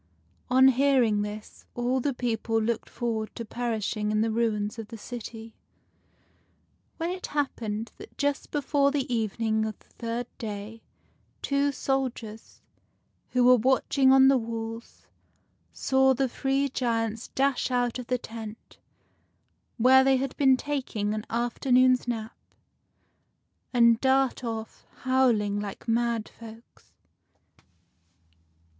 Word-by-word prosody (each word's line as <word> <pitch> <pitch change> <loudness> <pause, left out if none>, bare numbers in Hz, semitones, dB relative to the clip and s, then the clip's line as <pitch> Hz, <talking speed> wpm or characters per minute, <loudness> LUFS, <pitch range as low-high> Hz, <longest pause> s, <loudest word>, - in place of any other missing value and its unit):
On 260 +1 +6
hearing 255 -5 +3
this, 210 +1 -7
all 245 +2 0
the 280 +3 0
people 225 -2 -1
looked 225 +1 -2
forward 225 -3 -3
to 230 - -5
perishing 220 -2 -2
in 215 0 +1
the 225 0 +1
ruins 220 -1 -1
of 220 - -6
the 230 - -9
city, 225 -1 -8 1.4
when 335 +1 -2
it 365 0 -5
happened 230 -7 -3
that - - -13
just 285 0 -1
before 285 -1 +1
the 280 -2 -1
evening 220 0 0
of 220 -1 -4
the - - -27
third 235 +1 -4
day 215 0 -6 0.6
two 280 0 +1
soldiers, 255 -5 -4 0.7
who 250 -1 +2
were 250 0 +7
watching 265 +2 +3
on 265 0 +7
the 270 -1 +5
walls, 225 0 -7 0.7
saw 265 0 +2
the 270 +1 +1
three 270 +3 0
giants 230 -3 -2
dash 270 -1 +1
out 245 -1 0
of 245 - -7
the 250 - +1
tent, 225 -2 -10 1.0
where 260 +3 +6
they 265 0 +4
had 265 0 -3
been 265 -2 +4
taking 255 -8 -2
an 215 0 -4
after 240 +3 -2
noon's 255 0 +5
nap, 225 -2 -4 1.4
and 235 -2 +4
dart 265 -1 +2
off, 225 -2 -6 0.2
howling 235 -6 +2
like 205 +2 -7
mad 230 -1 0
folks. 230 0 -15
235 Hz, 125 wpm, -27 LUFS, 225-265 Hz, 1.4 s, were